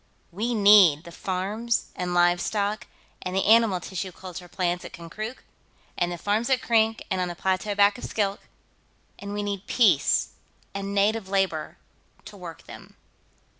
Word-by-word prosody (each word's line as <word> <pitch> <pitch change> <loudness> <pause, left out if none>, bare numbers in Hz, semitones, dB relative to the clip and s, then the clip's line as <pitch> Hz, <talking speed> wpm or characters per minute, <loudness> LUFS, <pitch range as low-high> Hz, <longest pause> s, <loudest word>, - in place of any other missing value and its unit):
We 225 +7 -2
need 200 -7 +6
the 170 - -11
farms 200 +7 -2
and 180 0 -3
livestock 200 +5 +1 0.3
and 185 0 -4
the 190 - +1
animal 220 -3 +5
tissue 185 +1 -5
culture 180 0 -9
plant 175 0 -2
at - - -10
Konkrook, 215 +9 -7 0.5
and 175 0 0
the 175 - -4
farms 210 +7 -1
at 260 -1 +3
Krink 225 -1 +2
and 185 -1 0
on 180 - 0
the 175 - -6
plateau 190 +3 -1
back 200 +2 +4
of - - -11
Skilk, 200 -2 -1 0.8
and 200 0 -7
we 205 0 -3
need 200 -1 -4
peace 240 -3 +3 0.4
and 200 0 -4
native 205 0 +1
labor 190 -6 -1 0.5
to 215 - -11
work 175 -4 -10
them." - - -13
200 Hz, 160 wpm, -25 LUFS, 180-215 Hz, 0.8 s, need